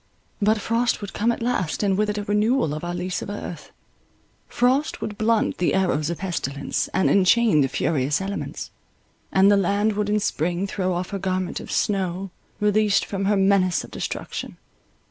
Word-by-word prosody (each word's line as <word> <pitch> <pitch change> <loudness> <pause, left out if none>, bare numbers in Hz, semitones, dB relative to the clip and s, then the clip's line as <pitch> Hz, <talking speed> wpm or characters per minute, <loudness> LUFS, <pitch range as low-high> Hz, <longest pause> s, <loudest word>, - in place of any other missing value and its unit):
But 215 +1 +3
frost 230 +3 0
would 205 - -6
come 230 +3 +1
at 235 - -4
last, 215 -8 -1
and 195 -2 +2
with 210 +2 +1
it 210 - -2
a 205 - -2
renewal 210 - +1
of 150 - -5
our 175 0 -3
lease 180 0 -3
of - - -6
earth. 205 -4 -7 0.8
Frost 260 +5 +1
would 210 - -4
blunt 220 +1 +1
the 175 - +2
arrows 170 -5 +1
of 170 - -3
pestilence, 145 -7 -2
and 190 - +1
enchain 200 -2 +4
the 135 - +3
furious 140 0 0
elements; 195 +1 -5 0.6
and 195 +1 +5
the 205 - +5
land 200 +3 +1
would 210 0 -1
in 210 0 +2
spring 175 0 -1
throw 185 -2 -1
off 180 +2 -3
her 200 - -3
garment 185 -1 -2
of - - -8
snow, 190 -2 -1 0.3
released 210 0 +2
from 195 -1 -3
her 205 +1 +2
menace 190 -3 +3
of - - -12
destruction. - - -5
195 Hz, 185 wpm, -23 LUFS, 180-210 Hz, 0.8 s, and